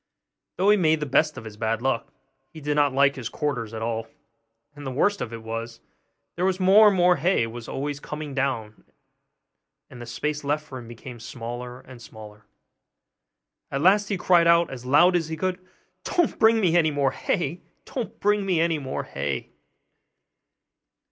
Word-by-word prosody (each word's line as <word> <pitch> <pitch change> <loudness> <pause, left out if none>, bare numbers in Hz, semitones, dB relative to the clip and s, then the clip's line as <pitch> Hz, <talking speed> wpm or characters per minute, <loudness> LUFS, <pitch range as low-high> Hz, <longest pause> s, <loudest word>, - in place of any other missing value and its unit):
Though 195 +3 +3
he 210 - +5
made 160 -4 +3
the 150 - -2
best 150 +2 +2
of 130 - -7
his 105 -1 -9
bad 110 0 -1
luck, 135 +2 -1 0.4
he 160 - -10
did 150 0 -1
not 145 -1 +3
like 140 +1 +3
his 125 -4 -5
quarters 125 -8 -3
at 110 -1 -5
all; 115 -1 -3 0.7
and 145 - -10
the 135 - -4
worst 200 +10 +1
of 115 - -4
it 115 -1 -8
was, 115 +1 -5 0.6
that 185 +2 0
more 195 +3 +7
and 200 -2 +3
more 180 0 +4
hay 180 -9 +2
was 115 0 -8
always 145 +1 -4
coming 150 -1 -6
down, 130 -6 -2 1.1
and 125 -2 -10
the 120 - -8
space 150 +5 -3
left 150 +2 -1
for 130 -4 -8
him 120 - -11
became 120 +1 -10
smaller 125 +1 -7
and 130 -2 -14
smaller. 105 -1 -13 1.2
At 135 - -2
last 200 +4 +4
he 200 - 0
cried 175 -2 +4
out 170 0 +4
as 125 -1 -8
loud 175 +7 +5
as 165 -3 0
he 160 - -4
could, 185 +2 -2 0.4
'Don't 345 -3 0
bring 225 0 +5
me 175 -5 +2
any 165 -2 +4
more 140 -2 +1
hay! 170 +3 -2 0.2
Don't 230 -6 -6
bring 205 0 +2
me 185 -4 +1
any 165 -1 +1
more 135 -2 -4
hay! 70 -2 -4
145 Hz, 180 wpm, -25 LUFS, 120-175 Hz, 1.2 s, more